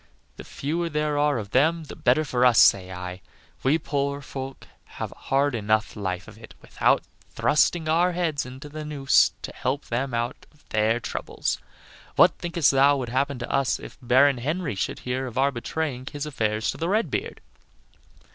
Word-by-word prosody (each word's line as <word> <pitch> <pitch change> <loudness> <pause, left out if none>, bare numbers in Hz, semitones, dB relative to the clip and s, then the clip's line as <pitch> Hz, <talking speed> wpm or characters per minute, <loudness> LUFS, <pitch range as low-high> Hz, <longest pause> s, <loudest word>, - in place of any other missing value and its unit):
The - - -8
fewer 165 +4 -3
there 150 -1 -1
are 145 -2 +2
of 105 -3 -6
them 160 +5 +3
the 150 - -10
better 130 +6 +2
for 125 -3 0
us, 125 -3 +5
say 95 -1 +5
I. 90 0 -6 0.4
We 140 +4 +3
poor 140 -2 -2
folk 135 0 -7 0.3
have - - -4
a - - -13
hard 140 +1 0
enough 110 -1 0
life 95 -3 -4
of 110 - -13
it 115 - -13
without - - +1 0.3
thrusting 160 +2 +2
our 175 +3 +3
heads 165 -5 -1
into 130 +4 -9
the 155 +1 -7
noose 145 -2 +3
to - - -6
help 135 +3 -2
them 130 +3 -2
out 120 +4 -3
of 150 - -28
their 110 +2 +2
troubles. - - -3 0.6
What - - +7
thinkest 170 -4 +2
thou 140 +1 +5
would 125 -3 -4
happen 140 +2 0
to 120 - -5
us 135 -2 +1
if - - -10
Baron 130 +2 +4
Henry 155 +2 -2
should 100 - -3
hear 130 +1 -2
of 125 0 -8
our 140 +1 +3
betraying 130 +1 -4
his 145 -1 -4
affairs 110 -7 -1
to - - -9
the 165 +2 -2
Red 215 +4 +1
beard?" - - -3
135 Hz, 185 wpm, -25 LUFS, 120-150 Hz, 0.6 s, What